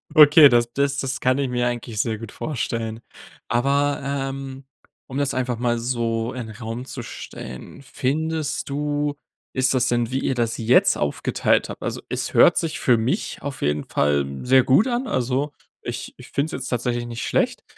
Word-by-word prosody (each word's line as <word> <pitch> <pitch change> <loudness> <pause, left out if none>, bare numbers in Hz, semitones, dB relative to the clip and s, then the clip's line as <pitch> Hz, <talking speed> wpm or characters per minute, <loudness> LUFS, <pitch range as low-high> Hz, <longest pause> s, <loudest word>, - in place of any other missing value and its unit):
Okay, 150 -1 +9
das 120 0 +2
das 140 0 +1
das 135 -1 -2
kann 130 +1 +2
ich 135 -2 0
mir 125 0 0
eigentlich 120 -3 -4
sehr 110 -2 -2
gut 115 -1 -9
vorstellen. 115 -6 -3 0.5
Aber, 140 +4 +1
ähm, 135 -1 -4 0.4
um 130 - -6
das 140 -2 0
einfach 125 -2 -1
mal 120 -1 +1
so 115 -1 -1
in 120 -4 -6
Raum 115 +2 -6
zu 130 -2 -7
stellen: 65 - -9
Findest 155 +4 -2
du 145 +1 -1 0.4
ist 130 0 +2
das 130 -1 +2
denn, 120 0 0
wie 130 - 0
ihr 135 - -1
das 120 -1 -1
jetzt 115 +2 +4
aufgeteilt 75 - +1
habt - - -8
also, - - -3
es - - -3
hört - - +6
sich 165 -2 -1
für 120 -2 +4
mich 125 - -2
auf 140 -1 -6
jeden 75 0 0
Fall 70 -1 +1 0.2
sehr 130 +1 +5
gut 165 - +4
an. 245 +1 -1
Also, 135 - -1 0.3
ich 120 0 -6
ich 125 - -13
finde 140 +2 0
es - - -9
jetzt - - -5
tatsächlich 120 0 -1
nicht 120 -1 -5
schlecht, - - 0
130 Hz, 180 wpm, -23 LUFS, 120-140 Hz, 0.5 s, Okay